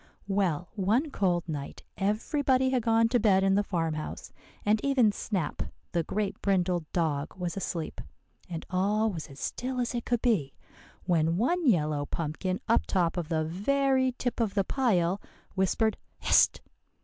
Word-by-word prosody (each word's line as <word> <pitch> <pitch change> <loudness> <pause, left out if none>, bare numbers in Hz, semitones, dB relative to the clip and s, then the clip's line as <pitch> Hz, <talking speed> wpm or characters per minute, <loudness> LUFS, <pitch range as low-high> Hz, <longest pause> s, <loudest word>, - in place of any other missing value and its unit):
"Well, 185 -4 0
one 225 - +1
cold 180 -6 0
night 145 -3 -6
everybody 260 +6 +1
had 255 -2 +2
gone 225 0 +3
to 245 0 +3
bed 195 -3 +4
in 195 0 +3
the 200 - +4
farmhouse, 165 -5 -3 0.3
and 210 +1 +2
even 260 -6 +4
Snap 195 -5 -3 0.3
the 170 - +1
great 205 +5 -3
brindled 180 -4 0
dog 155 -3 -1
was 175 -2 -3
asleep, 170 -4 -4 0.5
and 165 -2 -5
all 210 +4 +2
was 165 -5 -6
as 135 0 -13
still 255 +1 -3
as 245 0 -1
it 240 -1 -2
could 240 -1 0
be, 190 - +1 0.5
when 165 -2 +2
one 330 - +1
yellow 150 - +2
pumpkin 170 +4 -2
up 230 - +2
top 175 -4 +1
of 170 -3 -3
the 160 -2 +1
very 260 - +1
tip 245 0 -3
of 220 -4 0
the 200 - +3
pile 190 -6 +1 0.3
whispered, 205 +3 +1 0.3
'_Hist! - - +4
195 Hz, 160 wpm, -29 LUFS, 170-235 Hz, 0.5 s, bed